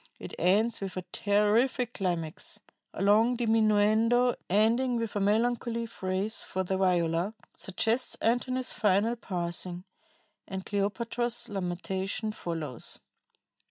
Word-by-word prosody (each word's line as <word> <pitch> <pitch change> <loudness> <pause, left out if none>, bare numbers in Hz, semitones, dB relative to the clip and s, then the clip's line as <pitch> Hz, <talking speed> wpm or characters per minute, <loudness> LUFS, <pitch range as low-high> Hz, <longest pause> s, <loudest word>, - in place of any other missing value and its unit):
It - - -9
ends 205 +7 +2
with 195 -1 -5
a 185 - -4
terrific 220 +4 +2
climax.... 170 -5 -3 0.3
A - - -4
long 220 +5 +4
diminuendo, 225 +2 +3 0.2
ending 230 +6 +3
with 230 -2 -3
a - - +1
melancholy 230 +3 +1
phrase 195 -1 -1
for 190 - -2
the 190 +1 -1
viola, 180 +1 +1 0.2
suggests 225 +6 0
Antony's 255 +2 +1
final 210 +3 +2
passing, 175 -3 -3 0.6
and 190 -1 -5
Cleopatra's 235 +4 -2
lamentation 190 +2 -2
follows. 165 - -4
210 Hz, 110 wpm, -29 LUFS, 185-230 Hz, 0.6 s, long